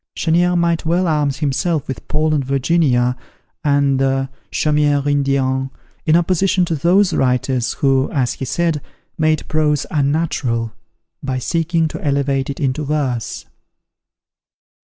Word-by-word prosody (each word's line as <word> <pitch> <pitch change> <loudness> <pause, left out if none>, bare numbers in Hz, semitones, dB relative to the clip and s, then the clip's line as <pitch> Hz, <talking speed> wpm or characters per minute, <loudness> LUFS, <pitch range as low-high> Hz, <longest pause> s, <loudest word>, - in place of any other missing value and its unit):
Chenier 175 +2 +2
might 170 -1 +1
well 175 +3 +1
arm 150 -3 +1
himself 150 +2 -1
with 135 - -6
"Paul 155 +1 +1
and 145 -2 +1
Virginia," 130 -2 +1 0.5
and 140 -2 +2
the 135 0 0 0.2
"Chaumiere 150 -2 +1
Indienne," 135 -2 +1 0.4
in 155 - +5
opposition 180 +2 +2
to 165 - -2
those 175 +5 +3
writers, 125 -1 0
who, 135 -1 +1
as 130 -3 0
he 135 - -5
said, 165 +2 -1 0.4
made 155 -1 +1
prose 150 -2 +1
unnatural, 140 -6 0 0.5
by 130 -2 -2
seeking 165 +5 0
to - - -7
elevate 140 -1 0
it 140 - -5
into 140 +2 -1
verse. 140 -5 -2
145 Hz, 130 wpm, -18 LUFS, 135-160 Hz, 0.5 s, in